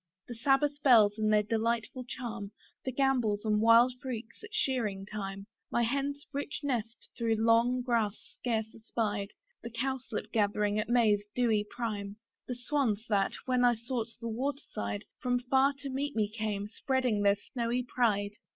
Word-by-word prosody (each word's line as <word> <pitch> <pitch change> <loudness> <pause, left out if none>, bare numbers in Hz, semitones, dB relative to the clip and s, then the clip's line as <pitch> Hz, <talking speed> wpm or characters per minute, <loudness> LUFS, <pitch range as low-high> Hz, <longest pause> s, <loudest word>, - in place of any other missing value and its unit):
The 240 - -6
sabbath 280 +4 +2
bells, 220 -6 +6
and 215 0 +2
their 210 0 +4
delightful 230 +3 -1
chime; 240 -6 -5 0.4
The 260 - -1
gambols 245 -6 +1
and 210 -1 +2
wild 230 +3 +6
freaks 240 - -6
at 430 - -10
shearing 225 - 0
time; 195 -1 -5 0.2
My 235 - +1
hen's 280 +4 -1
rich 285 +2 -3
nest 235 -5 -3
through 230 -2 +1
long 230 +3 +3
grass 225 -4 +1
scarce 220 -2 -3
espied; 215 -3 -2 0.3
The 235 - -6
cowslip 240 -2 -3
gathering 210 -1 +1
at 215 - -2
May's 220 -4 +4
dewy 225 -4 +2
prime; 210 -4 -4 0.3
The 250 - -3
swans, 245 -4 0
that, 200 -2 +2
when 255 -1 +2
I 245 -1 +5
sought 235 0 -3
the 230 - -5
water 270 +5 -2
side, 100 0 -3
From 245 0 +1
far 265 +3 +3
to 275 - -4
meet 285 +2 -2
me 215 -2 +2
came, 210 -2 -3
spreading 250 -1 0
their 200 0 +5
snowy 235 +3 -2
pride. 215 -5 +1
230 Hz, 160 wpm, -31 LUFS, 210-255 Hz, 0.4 s, bells